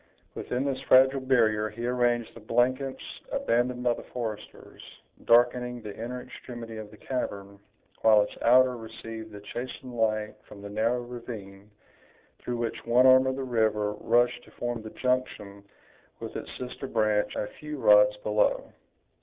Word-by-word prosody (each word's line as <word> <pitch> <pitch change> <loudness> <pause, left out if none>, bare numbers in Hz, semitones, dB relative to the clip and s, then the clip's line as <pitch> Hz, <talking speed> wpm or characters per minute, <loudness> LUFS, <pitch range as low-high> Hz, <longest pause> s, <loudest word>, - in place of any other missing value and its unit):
Within 125 +2 -3
this 135 -1 -2
fragile 130 +1 +6
barrier 110 -5 +2
he 115 +3 -6
arranged 120 -2 0
the - - -12
blankets 130 +4 0 0.3
abandoned 125 +1 0
by 120 -1 +3
the - - -8
foresters, 110 -4 -7 0.4
darkening 125 +1 +3
the 105 -1 -7
inner 125 +2 -6
extremity 120 -3 -9
of 110 -1 -8
the 105 - -15
cavern, 100 -6 -5 0.4
while 110 -2 +6
its 105 - -8
outer 125 +1 +5
received 110 -1 -9
a - - -8
chastened 125 +4 -7
light 110 -2 0
from 100 - -12
the 100 - -7
narrow 115 +4 0
ravine, 105 -5 -9 0.7
through 120 -1 -4
which 115 -1 -3
one 120 +2 +4
arm 130 0 +7
of 130 - 0
the 135 - -4
river 110 -4 +1
rushed 120 +3 +1
to - - -17
form 120 -1 -4
the 110 - -8
junction 110 -6 -2 0.6
with - - -7
its - - -6
sister 125 +2 -6
branch 110 -3 +1
a - - -1
few 150 0 -6
rods 105 -3 +5
below. 105 0 +1
120 Hz, 155 wpm, -27 LUFS, 110-125 Hz, 0.7 s, arm